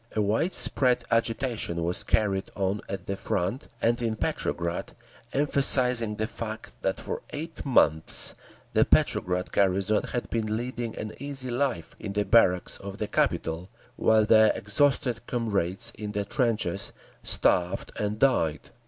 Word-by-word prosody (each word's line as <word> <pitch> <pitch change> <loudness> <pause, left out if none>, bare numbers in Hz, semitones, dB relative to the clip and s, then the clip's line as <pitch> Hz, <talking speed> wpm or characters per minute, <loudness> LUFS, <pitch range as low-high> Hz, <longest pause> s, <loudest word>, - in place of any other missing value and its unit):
A - - +1
wide 110 - +2
spread 125 -2 +4
agitation 115 -6 0
was 85 +2 -1
carried 100 -3 +1
on 100 +1 -1
at 95 -2 -5
the 100 - -2
Front 95 +8 -2 0.2
and 120 +1 +2
in 115 -2 0
Petrograd, 85 -5 -2 0.4
emphasizing 125 -5 +2
the 110 0 -1
fact 110 -1 -7
that 95 - -1
for - - -4
eight 160 +2 -6
months 80 - +2 0.4
the - - +5
Petrograd 90 +1 +1
garrison 100 +2 +2
had 120 - -3
been 110 -2 -1
leading 120 -1 -4
an 110 0 -5
easy 135 -2 -4
life 125 -8 -2
in 100 - -5
the 105 0 0
barracks 90 -6 +3
of 100 0 -7
the 105 - -3
capital, 85 -3 -1 0.3
while 110 -1 +3
their 110 0 +6
exhausted 120 +1 +1
comrades 100 -7 0
in 105 -1 -6
the 100 -1 -1
trenches 100 -4 -1 0.3
starved 90 0 +1
and 105 0 -1
died. 80 - +1
110 Hz, 145 wpm, -27 LUFS, 95-120 Hz, 0.4 s, their